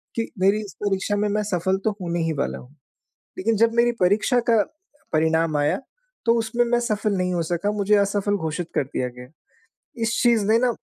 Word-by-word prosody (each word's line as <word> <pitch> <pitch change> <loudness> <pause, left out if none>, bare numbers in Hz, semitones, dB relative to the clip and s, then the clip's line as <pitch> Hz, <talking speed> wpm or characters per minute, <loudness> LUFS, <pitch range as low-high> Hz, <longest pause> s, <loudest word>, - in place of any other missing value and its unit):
कि 230 -1 -2
मेरी 195 +3 +3
इस 195 - -11
परीक्षा 205 0 0
में 210 +1 +1
मैं 210 +1 0
सफ़ल 190 -1 0
तो 220 - +3
होने 175 -1 -2
ही 160 0 0
वाला 140 - -2
हूँ। 130 +4 -15 0.6
लेकिन 220 +3 +1
जब 230 +2 +3
मेरी 240 0 +3
परीक्षा 205 +7 +3
का 225 -3 +5 0.5
परिणाम 160 0 +2
आया 145 0 +1 0.5
तो 230 - +5
उसमें 230 +2 +1
मैं 240 0 +1
सफ़ल 215 -2 -1
नहीं 180 0 0
हो 170 - 0
सका 175 +5 -1
मुझे 210 0 +2
असफ़ल 200 0 +1
घोषित 160 -1 -3
कर - - +1
दिया 130 -1 -3
गया। 125 0 -10 0.8
इस 225 - +1
चीज़ 235 -4 +3
ने 225 - +5
ना 250 -1 +2
200 Hz, 200 wpm, -23 LUFS, 170-220 Hz, 0.8 s, का